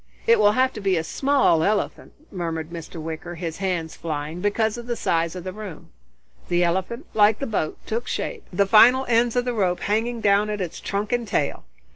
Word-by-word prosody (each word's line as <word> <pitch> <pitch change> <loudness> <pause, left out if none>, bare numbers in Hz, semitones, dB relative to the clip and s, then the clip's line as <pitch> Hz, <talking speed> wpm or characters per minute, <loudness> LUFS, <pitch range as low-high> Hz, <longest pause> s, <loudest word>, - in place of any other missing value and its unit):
"It 465 - +5
will 205 0 +5
have 260 +2 +2
to 215 - -7
be 195 -2 +2
a 160 - 0
small 270 - +2
elephant," 205 +4 -1 0.2
murmured 165 -3 -4
Mr. 165 0 -8
Wicker, 160 +2 -6
his 165 -2 -5
hands 180 -5 -2
flying, 155 +1 -4
"because 210 +2 +1
of 240 0 -8
the 240 - -1
size 165 -4 0
of 180 - -6
the 185 0 -5
room." 205 -6 -9 0.6
The 175 0 +2
elephant, 190 - -1
like 210 0 +4
the 275 - -3
boat, 205 -10 -2
took 235 +3 -3
shape, 470 -4 -3
the 200 +2 +2
final 245 +6 +6
ends 235 0 +2
of 245 0 +1
the 245 - -1
rope 185 -5 0
hanging 230 +3 0
down 205 0 +3
at 210 -1 -3
its 175 -3 -4
trunk 205 +1 -3
and 240 -2 0
tail. 145 - -1
200 Hz, 205 wpm, -23 LUFS, 170-230 Hz, 0.6 s, final